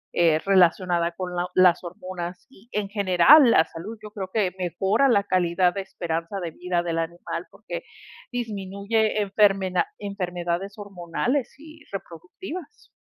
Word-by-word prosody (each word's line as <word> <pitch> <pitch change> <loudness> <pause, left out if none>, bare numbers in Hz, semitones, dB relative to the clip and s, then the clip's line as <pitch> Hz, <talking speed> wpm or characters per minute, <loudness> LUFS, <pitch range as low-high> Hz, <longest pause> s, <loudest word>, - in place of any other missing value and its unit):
eh, 165 -2 +4
relacionada 180 -2 +3
con 180 0 -5
la 175 0 -1
las 180 -1 +5
hormonas. 180 0 -7
Y 235 -3 -21
en 205 -1 -1
general 200 - +6
la 160 - +5
salud, 190 +8 -8
yo 210 - -9
creo 195 -3 -6
que 200 -5 +1
mejora 190 - +2
la 205 -5 +4
calidad 180 -1 +2
de 195 - -3
esperanza 170 +1 -4
de 165 - -4
vida 175 +1 -2
del 165 -1 -1
animal, 170 +1 -4
porque, - - -7 0.5
disminuye 215 -1 -1
enfermeda 195 - +2
enfermedades 180 -1 -3
hormonales 200 - -2
y 310 +1 -14
reproductivas. 200 - -9
185 Hz, 140 wpm, -24 LUFS, 175-210 Hz, 0.5 s, general